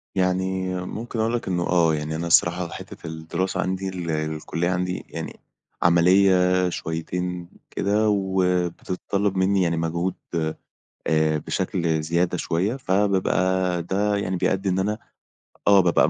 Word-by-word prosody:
يعني 95 0 0
ممكن 115 +3 -5
أقول 110 +1 +1
لك 120 -4 -2
إنه 90 -2 0
آه 85 -3 +4
يعني، 75 +1 -3
أنا 85 +2 -3
الصراحة، 85 +1 +3
حتَّة - - -9
الدراسة 80 +3 -2
عندي، 95 +1 -2 0.4
الكلية 80 +2 -2
عندي 90 0 -2
يعني - - -6 0.4
عمليَّة 90 +1 +4
شويتين 90 +2 -4 0.2
كده 105 +2 +1
وبتتطلَّب 95 0 0
مِنِّي 95 +1 +3
يعني 85 -1 0
مجهود 85 +3 -1 0.9
آآ 80 -1 +2
بشكل 80 +1 -1
زيادة 85 +3 0
شوية. 95 +10 0
فبابقى 95 -5 +1
ده 100 +3 0
يعني 95 -2 -1
بيأدِّي 95 +2 0
إن 95 - +1
أنا 105 +3 0 0.7
آه 100 -1 +7
بابقى 90 -2 +4
90 Hz, 125 wpm, -24 LUFS, 85-95 Hz, 0.9 s, آه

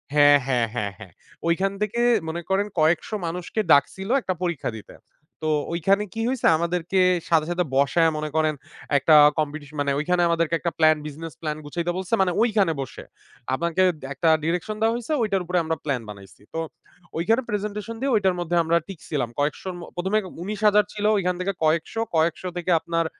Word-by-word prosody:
হ্যাঁ, 145 -1 +7
হ্যাঁ, 120 -3 +1
হ্যাঁ, 105 -4 -2
হ্যাঁ, 95 -5 -13 0.3
ওইখান 190 +4 +1
থেকে 215 +3 -1 0.3
মনে 170 +2 -3
করেন 200 +2 +1
কয়েকশো 160 +7 +2
মানুষকে 180 +5 -4
ডাকছিল 190 +8 +3
একটা 185 - -2
পরীক্ষা 170 -5 -2
দিতে। 105 - -12 0.5
তো 155 - -1 0.2
ওইখানে 195 +5 +2
কি 225 - -3
হইছে 260 -2 +1
আমাদেরকে 170 +2 -1 0.3
সাথে, 160 -2 +3
সাথে 180 +1 +1
বসায় 160 +4 +3
মনে 155 0 -3
করেন 155 -1 +2 0.4
একটা 155 +3 +5 0.2
কম্পিটিশন 150 0 -4
মানে 140 - 0
ওইখানে 175 +3 +1
আমাদেরকে 165 0 0
একটা 170 - -2
প্ল্যান 155 -1 +5
বিজনেস 155 +1 -8
প্ল্যান 155 -1 -3
গুছাইতে 170 +4 -2
বলছে 185 +3 -5
মানে 180 -2 +2
ওইখানে 210 -7 +3
বসে 130 - -8 0.5
আপনাকে 170 +6 0 0.3
একটা 160 +4 +1
ডিরেকশন 180 +6 -1
দেওয়া 225 +1 +3
হইছে 240 +5 -3
ওইটার 195 -4 0
উপরে 180 +1 -1
আমরা 160 0 -1
প্ল্যান 135 -5 -1
বানাইছি। 100 -4 -12
তো 165 - -2 0.6
ওইখানে 225 +9 +2
প্রেজেন্টেশন 210 +2 -3
দিয়ে 275 -1 +1
ওইটার 190 -3 +2
মধ্যে 175 0 -1
আমরা 165 +1 +2
টিকসিলাম 145 -8 -4
কয়েকশো 150 +6 -1 0.3
১ম 190 +3 -3
এ - - +4 0.2
১৯০০০ 210 +1 +3
ছিল 210 0 -3
ওইখান 180 -2 0
থেকে 195 +2 -1
কয়েকশো, 165 +8 0
কয়েকশো 165 +3 +1
থেকে 175 +1 -1
আপনার 165 0 -1
170 Hz, 175 wpm, -24 LUFS, 155-195 Hz, 0.6 s, হ্যাঁ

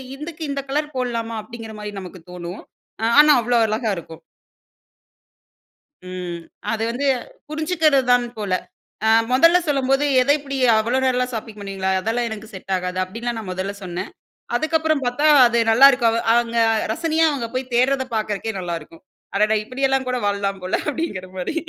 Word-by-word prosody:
இதுக்கு 310 +3 -8
இந்த 275 0 -2
கலர் 300 +2 -2
போட்லாமா? 230 -2 -2
அப்பிடிங்கிறமாரி 220 -2 -8
நமக்கு 185 0 -10
தோணும். 180 +1 -7 0.4
அ - - +1
ஆனா 300 0 +8
அவ்ளோ 240 +1 +1
அழகா 220 +1 -1
இருக்கும். 160 -1 -10 1.9
ம், 180 -2 -5 0.3
அது 225 -1 -1
வந்து 270 +4 -2 0.4
புரிஞ்சுக்கிறதுதான் 305 -6 +2
போல. 205 -3 -2 0.5
அ 220 - +4 0.2
முதல்ல 330 +7 +6
சொல்லும்போது 270 0 +1 0.2
எதை 280 +3 +4
இப்பிடி 275 -1 -6 0.2
அவ்ளோ 235 +4 +1
நேரம்லான் 250 -1 +1
ஷாப்பிங் 220 -1 -6
பண்ணுவீங்களா? 195 -1 -3
அதெல்லாம் 235 +3 -1
எனக்கு 220 0 -8
செட் 190 0 -5
ஆகாது. 180 0 -3
அப்பிடின்லாம் 230 +5 -4
நான் 205 -4 -7
முதல்ல 190 +2 -3
சொன்னேன். 185 +1 -5 0.5
அதுக்கப்பறம் 315 0 +1
பார்த்தா, 245 +5 +1 0.2
அது 235 0 +1
நல்லாயிருக்கவ 240 -1 +6 0.2
அவங்க 235 0 +1 0.4
ரசனையா 325 +5 +1
அவுங்க 255 -6 -3
போய் 255 0 -3
தேடுறத 260 +2 +2
பார்க்கறதுக்கே 215 0 -2
நல்லாயிருக்கும். 165 -2 -6 0.3
அடடா! 215 +1 +3
இப்பிடியெல்லாம் 265 +2 0
கூட 250 - 0
வாழலாம் 200 -1 -1
போல 185 - 0
அப்பிடிங்கிறமாரி 190 - -4
235 Hz, 140 wpm, -21 LUFS, 200-270 Hz, 1.9 s, ஆனா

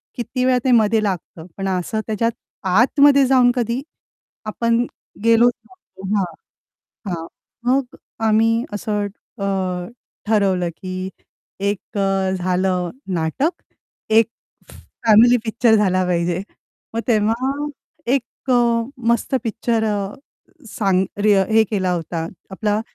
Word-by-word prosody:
किती 250 +1 -2
वेळा 255 -1 +4
ते 260 - +2
मध्ये 220 -1 +4
लागतं. 175 -4 -4
पण 195 0 -2
असं 190 +4 -1
त्याच्यात 230 +2 0 0.4
आतमध्ये 275 +7 +5
जाऊन 250 -2 +5
कधी 240 +2 -1 0.6
आपण 230 +2 +1 0.4
गेलोच 230 +1 +5
नव्हतो. 370 - -13
हां, 190 - +1 0.9
हां. 165 0 -6 0.4
मग 265 -1 0 0.3
आम्ही 225 +2 +3
असं 205 0 -2 0.4
अ, 185 -2 -1 0.4
ठरवलं, 195 -5 +2
की 185 0 -5 0.6
एक 205 0 -4
अ, 195 -1 +1
झालं 180 -1 0 0.2
नाटक, 170 - 0 0.6
एक 220 0 +5 0.8
फॅमिली 230 +3 +7
पिक्चर 225 0 +3
झाला 185 -3 +2
पाहिजे. 175 +1 0 0.5
मग 230 - 0
तेव्हा 240 +7 +1 0.5
एक 260 0 -3
अ, - - +5 0.5
मस्त 235 +3 +1
पिक्चर 225 0 0
अ, 205 -2 -2 0.5
सांग 195 -3 +1 0.2
रे 210 -1 +5 0.2
हे 220 0 +6
केला 190 -3 0
होता. 165 -1 -3 0.2
आपला 210 +2 -1
215 Hz, 115 wpm, -20 LUFS, 190-235 Hz, 0.9 s, फॅमिली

